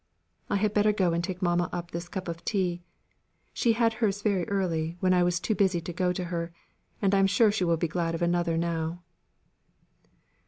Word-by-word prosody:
"I - - +1
had 205 +1 +1
better 210 0 +4
go 185 -5 +1
and 170 +1 0
take 185 +1 -4
mamma 175 0 +1
up 175 0 -5
this 170 +1 -5
cup 190 -1 -5
of 170 0 -5
tea. 180 -4 -1 0.7
She 235 - +2
had 230 0 +2
hers 205 -2 0
very 195 -5 0
early, 170 -4 -1
when 185 0 +3
I 180 - +4
was 175 -1 +2
too 220 - -1
busy 190 -4 +2
to 170 +1 -6
go 180 +1 +1
to 180 0 -3
her, 170 -1 -3 0.5
and 195 0 +3
I 195 - +4
am 195 - +4
sure 205 +2 +4
she 200 -3 0
will 170 -1 +2
be 170 - 0
glad 165 0 -1
of 170 - -2
another 170 -1 +1
now." 170 0 -2
180 Hz, 210 wpm, -28 LUFS, 170-195 Hz, 0.7 s, better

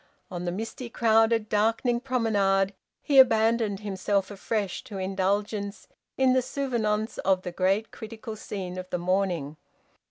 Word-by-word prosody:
On 175 -1 -4
the 175 - -1
misty, 225 +5 -5
crowded, 225 -1 +3
darkening 225 +3 +1
promenade 205 -6 +1 0.3
he 280 -2 +5
abandoned 225 -4 +4
himself 200 0 -1
afresh 205 -1 -3
to 210 -6 -7
indulgence 200 +2 -2 0.3
in 260 -1 +4
the 260 - +3
souvenance 230 -5 -2
of 190 -1 +1
the 180 - -4
great 195 +5 0
critical 220 0 -8
scene 185 -4 -6
of 185 0 -8
the 180 - -1
morning. 175 -5 -1
210 Hz, 135 wpm, -27 LUFS, 190-225 Hz, 0.3 s, he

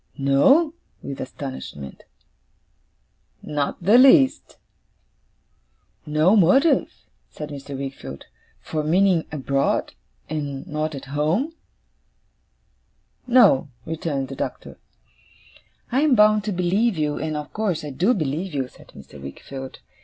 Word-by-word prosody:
'No?' 265 - +4 0.3
with 140 -1 -6
astonishment. 130 - -8 1.4
'Not 145 +3 -3
the 215 +7 +6
least.' 270 +1 +5 1.5
'No 155 +7 +3
motive,' 245 - +3 0.2
said 150 -1 -8
Mr. 140 -1 -7
Wickfield, 130 - -7 0.3
'for 155 -1 -4
meaning 180 +1 +3
abroad, 140 -2 -1 0.3
and 145 -3 -4
not 155 0 -3
at 140 - -8
home?' 170 - 0 1.7
'No,' 230 - +5 0.2
returned 155 -5 -3
the 135 - -6
Doctor. - - -6 1.1
'I 255 - +2
am 300 -4 +4
bound 210 -1 +5
to 215 - -1
believe 190 +4 +1
you, 150 -1 -1
and 155 0 -3
of 150 -1 -7
course 200 -8 -1
I 145 - -5
do 185 - +2
believe 160 +1 -3
you,' 130 -2 -2
said - - -18
Mr. 70 0 -13
Wickfield. 130 - -8
155 Hz, 115 wpm, -23 LUFS, 140-205 Hz, 1.7 s, the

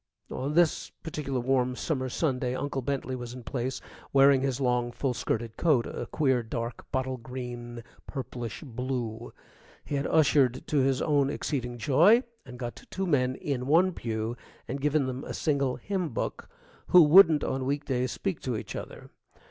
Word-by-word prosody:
On 140 +4 -3
this 170 -2 +3
particular 150 -5 -4
warm 125 0 +1
summer 130 -2 -2
Sunday 125 -3 -1
Uncle 135 0 -2
Bentley 130 -1 -2
was 120 -1 -7
in 125 - -9
place 130 +2 -3 0.3
wearing 135 -1 +6
his 135 -1 -1
long, 125 -2 +1
full 130 +1 -1
skirted 115 -1 -3
coat, 145 -8 +3
a - - -5
queer, 130 -5 +1
dark, 115 +1 -5
bottle 130 -1 -1
green, 120 -1 -7 0.2
purplish 125 -3 -6
blue. 120 -2 -4 0.5
He - - -6
had 140 0 0
ushered 140 -5 +3
to 150 - +1
his 135 0 +2
own 145 -3 +2
exceeding 125 -5 -3
joy, 165 - +5 0.2
and 125 -1 -9
got 120 -1 -7
two 195 - -2
men 130 -6 +2
in 130 -3 -3
one 175 +6 +4
pew, 110 -2 -3 0.3
and 135 +3 -4
given 150 0 +2
them 130 +1 -4
a - - -6
single 140 -4 0
hymn 190 -5 -2
book, - - -4 0.4
who 180 -2 +8
wouldn't 160 -1 +7
on 130 0 -1
week 145 +1 -1
days 130 -1 -1
speak 195 -5 -3
to 125 -4 -2
each - - -6
other. - - -8
130 Hz, 170 wpm, -28 LUFS, 125-145 Hz, 0.5 s, who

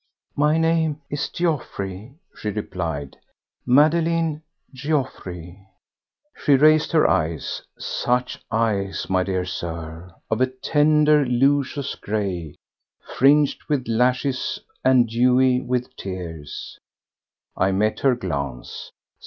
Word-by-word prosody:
"My 150 +2 +3
name 160 -2 +1
is 145 0 -2
Geoffroy," 115 - -3 0.2
she 105 - -4
replied, 85 -9 -4 0.5
"Madeleine 160 +3 +3 0.3
Geoffroy." 130 - -3 0.8
She 145 - +3
raised 155 +2 +4
her 155 - +5
eyes—such 105 +9 -2
eyes, 110 -4 -1
my 95 0 +3
dear 90 -1 -1
Sir!—of 85 +4 -5
a 130 - +4
tender, 150 +3 +3
luscious 140 +2 +1
grey, 95 -7 -3 0.6
fringed 145 +2 +4
with 140 -4 0
lashes 125 +3 0 0.3
and 130 -2 +5
dewy 125 +2 +3
with 125 -1 -3
tears. 85 -6 -7 0.8
I 95 +1 +2
met 105 +3 0
her 135 -2 +3
glance. 70 - -5
125 Hz, 95 wpm, -23 LUFS, 95-145 Hz, 0.8 s, her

